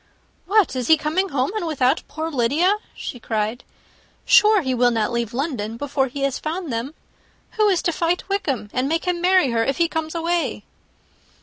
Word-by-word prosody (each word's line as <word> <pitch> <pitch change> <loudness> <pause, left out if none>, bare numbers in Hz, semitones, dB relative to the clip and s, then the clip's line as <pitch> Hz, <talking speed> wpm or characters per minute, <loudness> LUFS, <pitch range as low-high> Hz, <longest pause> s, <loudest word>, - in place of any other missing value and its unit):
"What! 405 -7 +3
is 250 -2 -2
he 320 - +6
coming 330 +6 -1
home, 270 +2 0
and 360 -6 -2
without 275 -2 +1
poor 315 +2 -4
Lydia?" 300 - +2 0.2
she 245 - -6
cried. 220 +1 -2 0.6
"Sure 425 -2 +5
he 260 -1 -1
will 245 0 +3
not 225 0 0
leave 235 -2 -2
London 240 -5 -3
before 280 0 -1
he 275 +2 -7
has 275 -1 0
found 320 -3 -4
them. 245 +7 -4 0.6
Who 430 -1 +2
is 370 -4 +1
to 340 - +1
fight 340 +2 -1
Wickham, 275 - -2
and 255 +2 0
make 330 +2 -1
him 355 -1 -1
marry 365 -7 +4
her, 230 -1 +1
if 275 +4 -1
he 335 - +3
comes 320 -1 -4
away?" 335 +1 -1
295 Hz, 190 wpm, -22 LUFS, 250-345 Hz, 0.6 s, he